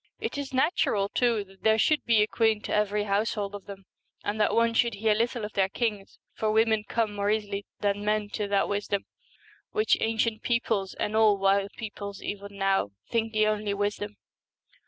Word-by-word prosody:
It 450 +1 -3
is 285 -1 -4
natural, 255 - +1
too, 235 -3 +1
that 195 -1 -20
there 220 0 +4
should 300 +7 +2
be 225 -3 +4
a - - 0
queen 220 -2 +1
to - - -3
every 210 0 +1
household 205 0 -1
of 205 -1 -8
them, 195 -1 -9 0.4
and 210 +1 -1
that 210 - +2
one 230 0 +3
should 235 0 +2
hear 215 +1 +2
little 230 +1 -1
of 210 - -8
their 195 -1 +2
kings, 210 -2 -3 0.2
for 215 -1 0
women 220 -1 +3
come 225 -2 0
more 205 0 -1
easily 205 -2 -1
than 205 0 0
men 210 0 0
to 210 0 -3
that 200 -1 +2
wisdom 205 -1 -2 0.7
which 430 0 +2
ancient 225 0 0
peoples, 225 -5 0
and 210 - -2
all 215 -2 +5
wild 195 0 +2
peoples 200 -3 -6
even 200 0 -6
now, 195 - +1 0.2
think 225 -1 0
the 215 -1 +3
only 210 -1 0
wisdom. 205 +1 -2
210 Hz, 190 wpm, -27 LUFS, 200-225 Hz, 0.7 s, all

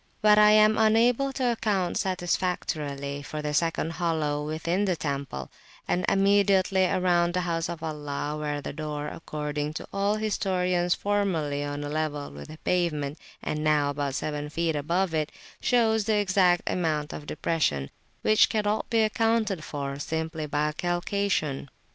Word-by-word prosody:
But 210 0 +7
I 210 0 +7
am 215 +1 +5
unable 235 +5 +3
to 255 -2 +1
account 205 -6 0
satisfactorily 155 -6 -2
for 150 +2 -6
the 150 0 -2
second 165 +1 0
hollow 155 -4 -1
within 165 +6 -1
the 185 -3 +1
temple, 140 - -4 0.4
and 180 0 +1
immediately 195 -1 +3
around 175 -2 +2
the 180 - +1
house 165 -2 -1
of 170 -1 -6
Allah, 150 -1 -3
where 150 -1 -3
the - - -6
door, 150 -1 -4
according 150 -1 -4
to - - -5
all 200 +1 +1
historians, 185 -4 0
formerly 170 -9 0
on 145 0 -4
a 145 - -4
level 150 -1 -2
with - - -9
the 155 +1 -10
pavement, 155 -5 -1 0.2
and 150 0 -2
now 150 -2 +3
about 140 -2 -2
seven 150 0 -3
feet 165 +1 -1
above 170 +5 0
it, 155 -1 0 0.3
shows 220 -3 +2
the 220 -1 +2
exact 185 -3 +3
amount 155 -4 -1
of 145 - -8
depression, 110 - -1 0.3
which 215 0 +5
cannot 210 -1 0
be 225 -2 +3
accounted 220 -5 +1
for 140 -2 -4
simply 160 0 -3
by 150 +1 0
calcation. 175 -4 -1
165 Hz, 155 wpm, -27 LUFS, 150-195 Hz, 0.4 s, But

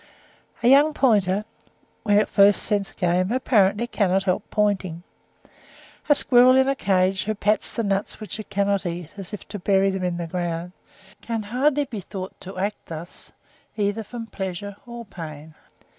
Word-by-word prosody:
A - - +4
young 290 +4 +6
pointer, 205 -5 +2 0.6
when 205 -2 +3
it 215 - +1
first 200 0 +4
scents 205 -2 -1
game, 180 +1 0
apparently 230 -4 +2
cannot 195 -5 +1
help 185 -2 0
pointing. 190 -5 0 1.1
A 290 - +7
squirrel 255 -2 +5
in 265 0 +4
a 275 - +1
cage 190 -3 +1
who 215 +1 -1
pats 210 +1 +1
the 230 - -2
nuts 200 0 -1
which 215 0 -7
it 215 - -8
cannot 200 0 +1
eat, 170 -2 -5
as 195 -2 -9
if 210 - -8
to 205 0 -6
bury 195 +1 +2
them 190 -1 -3
in 175 -1 -1
the 170 - -3
ground, 175 0 -3 0.5
can 225 -2 -3
hardly 275 +7 +1
be 240 -6 -6
thought 185 0 -7
to 190 0 -9
act 200 +3 -3
thus, 165 +2 -9 0.5
either 205 +1 0
from 230 +2 -7
pleasure 195 -1 -5
or 235 0 -8
pain. 160 -5 -9
200 Hz, 170 wpm, -23 LUFS, 185-225 Hz, 1.1 s, A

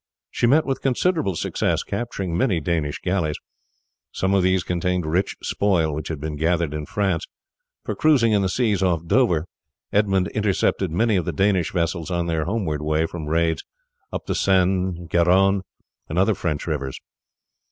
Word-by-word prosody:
She 120 - +1
met 150 +6 +4
with 135 -1 -2
considerable 135 - +1
success, - - -1
capturing 100 -8 -3
many 95 -2 +2
Danish 80 -2 -1
galleys. 85 -5 0 0.7
Some 95 +1 0
of 100 - +4
these 95 0 +2
contained 90 0 -1
rich 90 +6 0
spoil, 85 -7 +1
which 75 +1 -4
had 80 -3 -4
been 75 0 -4
gathered 80 0 0
in 75 -1 -5
France, 95 -5 -1 0.6
for - - -2
cruising 135 -8 +3
in 105 -2 +3
the 95 - 0
seas 105 -2 +1
off 85 -3 +1
Dover 85 -6 +2 0.5
Edmund 95 -3 +2
intercepted 100 -1 0
many 105 +6 +2
of 90 - -1
the 85 - -1
Danish 95 +1 +1
vessels 85 -1 -1
on 85 -1 -1
their 80 -2 -1
homeward 90 -7 -2
way 75 +1 +1
from 80 -2 -6
raids 80 +1 +1 0.5
up - - -5
the - - -1
Seine, 95 -2 +1
Garonne, 95 +4 +3 0.5
and 80 - -3
other 95 +4 +4
French 80 -6 -3
rivers. 70 -5 -3
90 Hz, 165 wpm, -23 LUFS, 80-100 Hz, 0.7 s, met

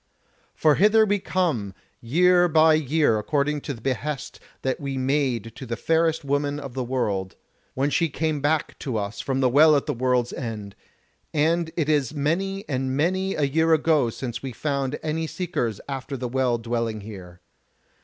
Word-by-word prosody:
For 155 -1 +4
hither 215 +6 +5
we 205 -1 +1
come 150 - -1 0.3
year 175 +8 +4
by 160 -1 +5
year 150 -6 +2
according 145 +6 0
to 140 - -4
the 115 - -14
behest 135 +2 -3 0.2
that 130 -1 -1
we 140 -2 -4
made 130 -4 -1
to 130 - -8
the 115 - -2
fairest 160 -2 +1
woman 145 +1 0
of 140 -4 -8
the 130 0 -2
world, 105 -7 -2 0.4
when 140 +2 0
she 165 +1 +2
came 155 0 -1
back 150 +1 0
to 125 -5 -3
us 100 +1 -4
from 135 -1 -1
the 130 - +4
Well 150 +4 +6
at 140 - +1
the 150 - -1
World's 125 -1 0
End, 105 -5 -6 0.6
and 160 +2 +2
it 160 -4 +1
is 150 -2 +1
many 195 +8 -1
and 130 0 -1
many 185 +5 0
a 150 - 0
year 160 +3 +3
ago 150 -5 +2
since 120 0 -5
we 135 -2 -5
found 140 0 -2
any 160 +1 -2
seekers 155 - -3
after 135 0 -5
the 125 0 -3
Well 125 -1 +1
dwelling 115 -2 -2
here. 95 -4 -10
140 Hz, 175 wpm, -24 LUFS, 120-160 Hz, 0.6 s, Well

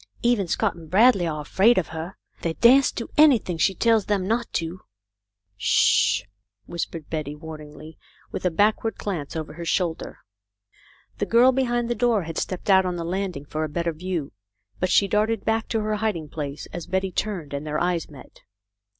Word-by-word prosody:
Even 235 -6 +2
Scott - - 0
and 165 -2 -13
Bradley 195 -1 +5
are 155 -2 -3
afraid 195 +10 +3
of 185 - 0
her. 165 +3 -6 0.2
They 165 - -1
dasn't 260 +3 +5
do 230 - -5
anything 245 - +4
she 195 - +2
tells 225 -2 +2
them 195 -3 0
not 230 +2 -1
to." 165 +2 -3 0.4
" 100 0 -54
Sh 100 - +3
I - - -27 0.2
" 100 0 -54
whispered 165 -2 -5
Betty, 150 -2 -3
wamingly, 155 0 -10 0.3
with - - -5
a 180 - +3
back 205 +6 +2
ward 225 -2 -2
glance 170 -9 -4
over 155 -2 -5
her 170 +2 -7
shoulder. 165 0 -2 1.0
The - - -1
girl 240 +3 +6
behind 240 -2 0
the 240 - 0
door 235 -4 +1
had 165 -1 -4
stepped 185 - -4
out 190 0 +6
on 180 -1 -2
the 170 - -4
landing 180 -4 -3
for 155 +1 -3
a 155 - -3
better 170 +2 -2
view, 170 -3 -4 0.5
but 185 - 0
she 200 - +4
darted 215 +2 0
back 225 0 0
to 225 - -1
her 215 0 -1
hiding 200 -8 -2
place 145 -2 -5
as 175 - -6
Betty 190 +1 -1
turned, 180 -8 -3
and 140 +1 -3
their 150 0 -1
eyes 175 -1 -1
met. 145 -3 -14
180 Hz, 195 wpm, -24 LUFS, 155-215 Hz, 1.0 s, girl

